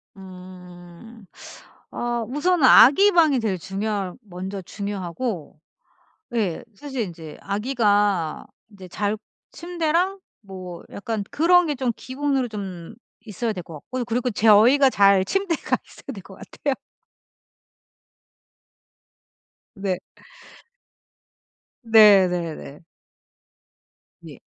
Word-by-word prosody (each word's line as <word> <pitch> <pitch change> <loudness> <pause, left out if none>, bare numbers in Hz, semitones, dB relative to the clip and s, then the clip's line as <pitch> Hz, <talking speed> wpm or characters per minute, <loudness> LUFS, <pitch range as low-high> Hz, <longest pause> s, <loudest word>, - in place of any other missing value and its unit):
음. 185 +2 -13 0.7
아 240 -1 -3
우선은 295 +3 +1
아기 385 - +7
방이 315 -7 +4
제일 205 -5 -1
중요할 195 0 -3
먼저 190 -1 -7
중요하고 190 - -5 0.8
예. 200 -8 -1
사실 265 +1 -5
인제 165 -6 -8
아기가 205 - 0 0.3
인제 190 -3 -13
잘 205 +4 -2 0.4
침대랑 350 +3 -1 0.2
뭐 185 -3 -9
약간 210 0 -4
그런 355 +3 +4
게 295 - -1
좀 250 -2 -1
기본으로 265 0 -2
좀 190 -6 -7 0.3
있어야 220 +2 -3
될 180 - -7
거 165 -1 -12
같고 250 - -5
그리고 245 +2 -1
저희가 230 +6 +5
잘 195 -3 +4
침대가 390 - -1
있어야 275 - -11
될 195 - -10
거 195 - -14
같아요. 280 +8 -4 3.0
네. 195 -3 -2 1.9
네, 210 -4 +7
네, 170 -3 -3
네. 70 -1 -11 1.5
예. - - -12
210 Hz, 185 characters per minute, -23 LUFS, 185-260 Hz, 3.0 s, 아기